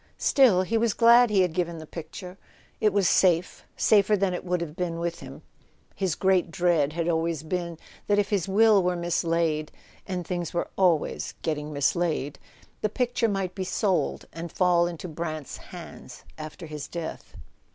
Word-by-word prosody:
Still, 235 -10 +4
he 225 +4 0
was 230 -2 +1
glad 235 +1 +6
he 200 -2 +3
had 180 -3 -1
given 170 -1 -2
the 160 - -8
picture. 180 +4 -9 0.4
It 210 - +3
was 200 -2 +2
safe, 180 -2 +2
safer 210 0 +4
than 190 -1 0
it 180 - -4
would 180 0 -1
have 165 -2 -5
been 170 -2 -2
with 170 0 -3
him. - - -11 0.5
His 190 -5 -1
great 190 -2 +2
dread 165 -4 +1
had 170 0 -2
always 165 -2 0
been 170 0 -3 0.3
that 205 - +3
if 205 +1 +1
his 200 -4 0
will 210 +1 +5
were 180 0 0
mislaid 165 -2 0 0.4
(and 185 -2 -2
his 170 - -12
things 175 -3 -3
were 170 - -2
always 175 -5 +1
getting 150 -1 -2
mislaid) 145 -1 -1 0.4
the 215 - +1
picture 245 0 0
might 195 -3 -2
be 190 - -4
sold, 190 0 -1
and 165 0 -7
fall 175 -2 +3
into 175 +1 -6
Brant's 155 -2 -5
hands - - -11
after 155 +3 -8
his 150 -2 -7
death. 170 -2 -7
175 Hz, 175 wpm, -26 LUFS, 165-195 Hz, 0.5 s, glad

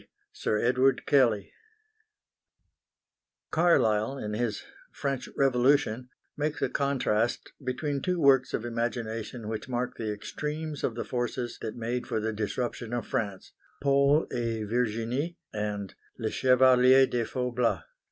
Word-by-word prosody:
SIR 105 - -1
EDWARD 130 +2 +2
KELLEY 120 -8 +3 2.0
Carlyle 135 -8 +3
in 105 -5 -4
his 110 -1 -2 0.3
French 135 -2 -3
Revolution 130 -2 +2 0.3
makes 150 0 -2
a - - +1
contrast 125 -5 0
between 140 +2 -2
two 180 -1 0
works 135 -3 +4
of 115 - -4
imagination 115 -1 -3
which 110 +3 -5
mark 125 0 -2
the 110 -2 -2
extremes 150 +8 -5
of 115 - 0
the 115 - -4
forces 120 -1 -3
that 110 - -4
made 120 +1 -3
for - - -1
the 110 +1 -2
disruption 115 +2 -3
of 120 -3 -2
France, 105 -7 -3 0.3
Paul 140 +2 +4
et 115 -2 -2
Virginie 120 +7 -1 0.2
and 105 -2 -3 0.2
Le 110 -3 -2
Chevalier 130 0 +6
de 120 -2 -1
Faublas. 125 -1 -1
125 Hz, 125 wpm, -28 LUFS, 110-135 Hz, 2.0 s, Chevalier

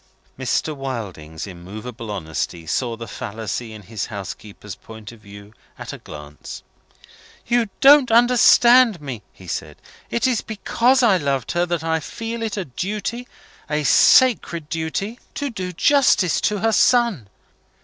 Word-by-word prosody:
Mr. 135 +4 -1
Wilding's 100 - -6
immovable 105 +6 -9
honesty 85 -3 -4
saw 115 +8 -2
the 115 0 -8
fallacy 110 +2 -5
in 110 -1 -11
his 105 +1 -5
housekeeper's 100 0 -8
point 110 -1 -12
of 115 - -15
view 100 0 -14 0.2
at - - -7
a - - -9
glance. 75 0 -10 0.8
"You 235 -3 +1
don't 275 -1 +7
understand 240 -1 +5
me," 135 -7 -7
he 95 - -16
said. 85 - -5 0.3
"It's 235 -1 0
because 240 +4 +1
I 210 -6 +5
loved 140 -6 -2
her 175 +1 0
that 170 -2 -2
I 160 0 0
feel 230 +7 -6
it 220 -2 -3
a 190 - -3
duty 210 - -4 0.4
a 150 0 -1
sacred 170 - +4
duty 180 +8 -3 0.2
to 285 -2 -3
do 185 -5 -5
justice 205 - +3
to 210 - 0
her 225 +1 +2
son. 225 - +2
150 Hz, 140 wpm, -21 LUFS, -, 0.8 s, don't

